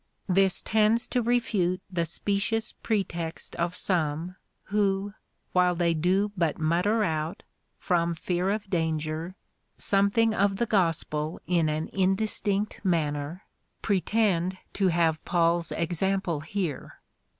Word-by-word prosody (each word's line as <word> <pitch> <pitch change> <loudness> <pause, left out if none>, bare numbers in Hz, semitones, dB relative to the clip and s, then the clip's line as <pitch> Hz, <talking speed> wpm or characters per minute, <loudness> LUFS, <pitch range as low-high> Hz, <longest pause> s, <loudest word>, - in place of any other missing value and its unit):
This 190 0 +3
tends 220 +2 +2
to 250 - +1
refute 220 -7 +1
the 170 -2 0
specious 205 +6 -1
pretext 170 -6 -3
of 170 +1 -1
some, 170 -1 -1 0.3
who, 200 0 0 0.4
while 180 -1 +3
they 170 -1 +2
do 185 +6 +1
but 170 -5 0
mutter 180 +8 +2
out, 160 -3 -2 0.3
from 170 -1 0
fear 180 +3 -1
of 205 0 -2
danger, 160 0 -2 0.4
something 200 +3 +3
of 200 -1 +2
the 235 - 0
gospel 165 -6 0
in 170 -3 +2
an 155 +1 -2
in 190 0 +2
distinct 205 -1 -1
manner,^ 155 -2 -1 0.4
pretend 190 -3 +1 0.2
to 195 -1 +2
have 165 -2 +1
Paul's 170 -1 +1
example 175 0 0
here. 165 -2 -4
180 Hz, 120 wpm, -27 LUFS, 165-200 Hz, 0.4 s, This